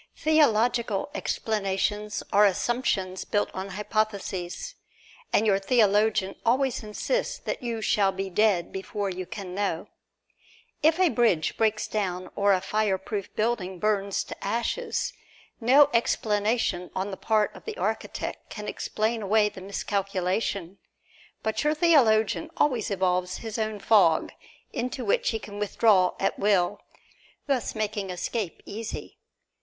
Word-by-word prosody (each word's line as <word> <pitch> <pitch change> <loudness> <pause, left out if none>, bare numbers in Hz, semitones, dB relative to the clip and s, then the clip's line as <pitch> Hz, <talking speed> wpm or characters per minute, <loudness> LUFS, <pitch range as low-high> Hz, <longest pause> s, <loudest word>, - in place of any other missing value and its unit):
Theological 240 -7 +2
explanations 210 0 -1
are 205 +1 +6
assumptions 195 -3 -1
built 205 - 0
upon 190 +1 -6
hypotheses, 210 - -2 0.6
and 215 - +3
your 195 -2 +3
theologian 210 -2 +3
always 255 +2 +2
insists 365 - -2
that - - -4
you 230 -3 -3
shall 200 -2 +3
be 195 0 -4
dead 190 -2 +2
before 195 +1 -3
you 185 0 -5
can 190 -3 -7
know. 195 -4 -2 0.9
If 320 +3 +4
a 370 -2 +5
bridge 230 - +2
breaks 220 -1 +1
down 185 -3 -3
or 200 0 +3
a 185 -2 +3
fireproof 200 0 -2
building 210 -5 -1
burns 200 0 0
to - - -10
ashes, 235 - -1 0.5
no 265 +5 +6
explanation 210 -5 +1
on 190 +2 -2
the - - -4
part 215 +1 +1
of - - -13
the 445 0 -5
architect - - -3
can - - -7
explain 220 +1 -1
away 210 +1 +3
the 195 -2 -11
miscalculation; 195 -1 -2 0.6
but 220 +4 -1
your 300 +1 +2
theologian 225 - +3
always 250 -7 +1
evolves 185 -2 0
his 225 0 -5
own 215 -1 -1
fog, 195 -6 +4 0.4
into 250 0 -3
which 200 - +2
he 225 - -1
can 205 -1 -9
withdraw 205 -2 +3
at 195 - 0
will, 200 -1 +2 0.6
thus 265 -6 -1
making 210 -2 -2
escape 180 +1 -3
easy. 220 +2 -7
210 Hz, 130 wpm, -26 LUFS, 195-230 Hz, 0.9 s, are